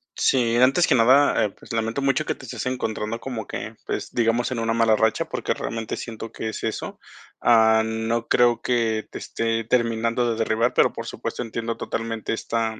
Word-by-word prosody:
Sí, 120 -3 +2
antes 135 +8 +5
que 150 - +3
nada, 130 +4 +5
eh, - - -1
pues, 100 - -12
lamento 115 +3 -1
mucho 135 +3 +2
que - - -1
te 130 - -12
estés 125 - -5
encontrando 115 -3 -3
como 115 -5 -5
que, - - -6
pues, - - -4
digamos, 120 +1 +1
en 120 - -2
una 115 0 0
mala 115 -1 +4
racha, 110 0 +1
porque - - -2
realmente 115 -1 -4
siento 115 -1 -7
que 110 - -4
es - - -6
eso. 110 - -4 0.4
Ah, 110 -1 +5
no 110 +1 -2
creo 120 -1 +3
que 115 -3 0
te - - -7
esté 115 0 -2
terminando 115 0 +1
de 115 - -3
derribar, 115 +1 +1
pero - - +4
por - - -6
supuesto, - - -5
entiendo 115 0 -4
totalmente 115 -1 -4
esta, 110 -1 -2
115 Hz, 190 wpm, -23 LUFS, 110-120 Hz, 0.4 s, antes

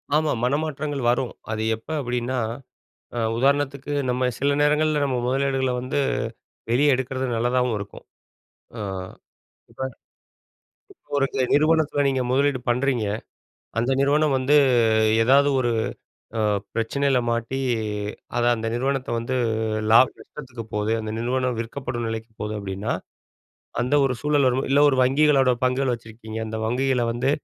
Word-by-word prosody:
ஆமா, 155 -1 +2
மனமாற்றங்கள் 145 +1 -1
வரும். 125 0 -1 0.2
அது 110 - -2
எப்ப 110 +7 -18
அப்டின்னா, 125 +1 -2 0.8
அ - - -1 0.2
உதாரணத்துக்கு 140 +2 +1 0.2
நம்ம 125 +1 0
சில 140 +1 +2
நேரங்கள்ல 150 +1 +3
நம்ம 135 -2 0
முதலீடுகள 135 0 +1
வந்து 130 +3 -2 0.7
வெளியே 140 +5 +3
எடுக்கிறது 130 +1 -3
நல்லதாவும் 125 0 +1
இருக்கும். 100 0 -8 0.7
அ, - - -6 0.9
இப்ப - - -8 1.1
இப்ப - - -41
ஒரு 135 - +3
சில 130 - +1
நிறுவனத்தில 155 -1 +3
நீங்க 135 -1 +1
முதலீடு 140 0 +2
பண்றீங்க. 125 -2 +1 0.7
அந்த 120 +3 0
நிறுவனம் 145 0 +3
வந்து 130 +3 +3 0.7
ஏதாது 140 +4 +5
ஒரு, 120 -2 +1 0.7
அ - - +1 0.3
பிரச்சனையில 135 +3 +1
மாட்டி, 115 +3 -2 0.8
அத 120 - +1
அந்த 115 0 -4
நிறுவனத்தை 135 +1 -1
வந்து 120 +3 -3 0.6
லாப 115 +3 +8
நஷ்டத்துக்கு 125 -6 -9
போகுது 105 +2 0
அந்த 110 0 -4
நிறுவனம் 125 0 -1
விற்கப்படும் 120 -1 -4
நிலைக்கு 115 0 -5
போது 105 0 -3
அப்படின்னா, 100 +1 -3 0.9
அந்த 125 +4 0
ஒரு 130 - -1
சூழல் 150 -2 +3
வரும் 130 +2 0
இல்ல 140 +1 +4
ஒரு 130 - 0
வங்கிகளோடய 135 -2 +3
பங்குகள் 130 0 +1
வச்சிருக்கீங்க, 110 -1 -8
அந்த 110 0 -4
வங்கிகள 125 +1 +1
வந்து, 125 +3 0
130 Hz, 130 wpm, -24 LUFS, 120-140 Hz, 1.1 s, லாப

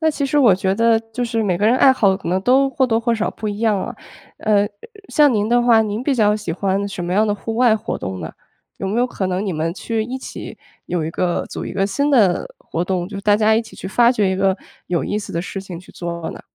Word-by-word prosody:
那 315 -1 +3
其 290 -2 -2
实 285 +2 +1
我 240 -9 +6
觉 190 +1 0
得 230 +1 +3
就 245 +2 -2
是 230 -1 -1
每 185 -5 0
个 205 - +2
人 235 +3 +4
爱 265 0 +6
好 200 -7 +2
可 190 - -7
能 185 +2 +1
都 265 +5 +4
或 260 0 +1
多 225 -2 +1
或 235 0 +1
少 220 0 -1
不 215 - -5
一 205 - -4
样 220 -2 +2
啊。 - - -5 0.4
呃， 205 -2 +2 0.4
像 295 -3 +4
您 210 -1 0
的 240 +1 +4
话， 230 -2 +5
您 215 +2 -3
比 275 +1 +1
较 210 -4 +3
喜 210 -6 -4
欢 195 +3 -1
什 180 -3 -5
么 175 - -3
样 215 +3 +3
的 205 - +1
户 225 +2 -5
外 240 -2 +4
活 210 - -4
动 95 0 -5
呢？ 80 -1 -6 0.5
有 195 - -3
没 210 +5 -1
有 245 - +3
可 195 -6 -3
能 185 +2 -2
你 195 - -2
们 160 +1 -2
去 225 +2 -2
一 250 +3 -5
起， 265 - -8 0.3
有 175 -3 -2
一 160 - -3
个 175 +1 -1
组 - - -6
一 - - -6
个， 195 0 0
新 280 +8 0
的 210 -10 +3
活 165 - -4
动， 180 -1 -1
就 205 - -7
是 - - -4
大 205 0 +4
家 220 0 +3
一 225 - +3
起 225 -1 -12
去 - - -7
发 235 +5 +4
掘 210 -6 +1
一 190 - -1
个 190 0 +2 0.3
有 175 -1 -1
意 210 - -1
思 210 - -7
的 170 - -2
事 195 +1 -6
情 185 -3 -8
去 180 - -15
做 170 -1 -5
呢？ - - -9
210 Hz, 300 characters per minute, -20 LUFS, 190-235 Hz, 0.5 s, 我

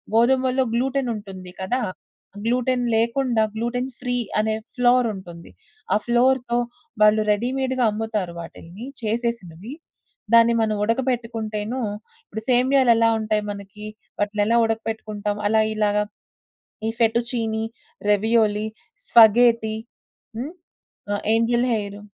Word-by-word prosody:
గోధుమలలో 260 +2 +3
గ్లూటనుంటుంది. 230 -8 -2
కదా! 215 +7 0 0.7
గ్లూటెన్ 250 +1 +1
లేకుండా 235 0 +1
గ్లూటెన్ 245 +3 -2
ఫ్రీ 250 -1 -2 0.2
అనే 215 0 +1 0.2
ఫ్లౌరుంటుంది. 220 -9 0 0.4
ఆ - - +4
ఫ్లౌర్‌తో 240 0 +2 0.4
వాళ్ళు 215 0 +6
రెడీమేడ్‌గా 255 +4 0
అమ్ముతారు 210 -4 -3
వాటిలిని 170 +5 -10 0.2
చేసేసినవి. 225 - -3 0.6
దాన్ని 230 0 +7
మనం 215 -1 +1
ఉడకబెట్టుకుంటేను, 230 -1 -2 0.5
ఇప్పుడు 220 - -7
సేమ్యాలెలా 250 -2 +4
ఉంటాయి 215 -1 0
మనకీ, 200 +1 -9 0.3
వాటిలినెలా 210 +2 +1
ఉడకపెట్టుకుంటాం 215 -2 -3
అలా 220 0 +4
ఇలాగా 210 -1 +2 0.9
ఈ - - +1
ఫెటు 230 0 +3
చీనీ, 225 -2 -1 0.5
రావియోలీ, 215 0 +2 0.4
స్పగేటి. 230 -1 +5 0.6
హ్మ్. 285 +8 -5 0.6
ఆ! - - +1 0.2
Angel 235 +2 +2
hair. 205 -1 -4
225 Hz, 100 wpm, -23 LUFS, 210-245 Hz, 0.9 s, దాన్ని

